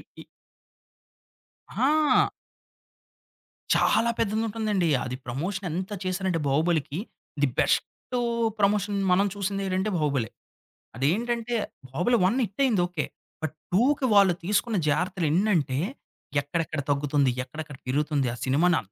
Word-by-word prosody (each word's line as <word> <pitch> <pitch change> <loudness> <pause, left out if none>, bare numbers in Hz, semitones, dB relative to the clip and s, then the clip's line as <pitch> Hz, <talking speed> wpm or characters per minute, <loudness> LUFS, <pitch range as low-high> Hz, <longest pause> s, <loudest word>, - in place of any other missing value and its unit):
P - - -10 1.5
ఆ! 300 +2 +3 1.5
చాలా 235 - +3
పెద్దది 215 0 +1
ఉంటుందండి. 210 -5 0 0.2
అది 125 - -4
ప్రమోషన్ 180 +10 -3
ఎంత 185 +5 -3
చేసారంటే 185 -2 0
'బాహుబలికి.' 155 +1 +1 0.4
థి 145 - +4
బెస్ట్ - - +3 0.7
ప్రమోషన్ 205 0 +2 0.2
మనం 190 +3 +4
చూసిందేంటంటే 195 0 -1
బాహుబలే. 140 -8 0 0.7
అది 130 +4 -1
ఏంటంటే 235 +2 -2 0.3
బాహుబలి 180 - +1
1 230 +7 +1
హిట్ 200 +4 -4
అయింది 230 -9 +3
ఓకే. 175 -4 -3 0.4
బట్ 155 -1 -3 0.2
2కి 265 +6 +3
వాళ్ళు 200 -3 +6
తీసుకున్న 210 +4 +1
జాగ్రత్తలు 180 +3 0
ఏన్నంటే 165 -7 +2 0.6
ఎక్కడెక్కడ 155 +1 -2
తగ్గుతుంది? 140 -1 +2
ఎక్కడెక్కడ 145 +2 -8
పెరుగుతుంది? 145 0 +1
ఆ - - -5
సినిమాని 160 +6 +3
అంత 100 - -22
180 Hz, 115 wpm, -26 LUFS, 145-205 Hz, 1.5 s, వాళ్ళు